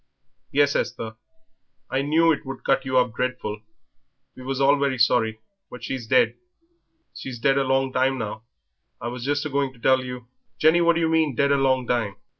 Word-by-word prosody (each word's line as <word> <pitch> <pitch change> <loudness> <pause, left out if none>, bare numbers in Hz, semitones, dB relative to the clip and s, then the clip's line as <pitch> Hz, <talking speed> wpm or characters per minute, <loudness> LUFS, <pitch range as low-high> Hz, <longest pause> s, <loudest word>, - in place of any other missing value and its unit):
"Yes 145 0 +3
Esther. 115 -2 -3 0.7
I 130 - -1
knew 160 +4 +3
it 150 - -1
would 135 0 -8
cut 135 0 +1
you 130 -1 0
up 125 -3 +2
dreadful; 110 -4 -3 0.7
we - - -12
was 135 +1 -4
all 140 +1 +5
very 140 -2 0
sorry, 110 -2 +2 0.3
but 125 -2 -11
she's 125 -3 -5
dead. 250 - +3 0.8
She's 130 -2 -7
dead 135 +4 +2
a - - +2
long 135 0 0
time 130 +1 +1
now, 110 -2 -5 0.6
I 120 - -4
was 125 0 -7
just 145 +2 -1
a - - -2
going 140 -1 -1
to 120 - -20
tell 130 +2 +3
you 125 -1 -7 0.2
" - - -50
"Jenny, 160 +3 +4
what 170 0 +4
do 165 - -1
you 165 - +2
mean? 160 -4 +1
Dead 140 +3 +2
a - - +4
long 130 -2 +1
time?" 115 -5 -1
130 Hz, 205 wpm, -24 LUFS, 125-140 Hz, 0.8 s, all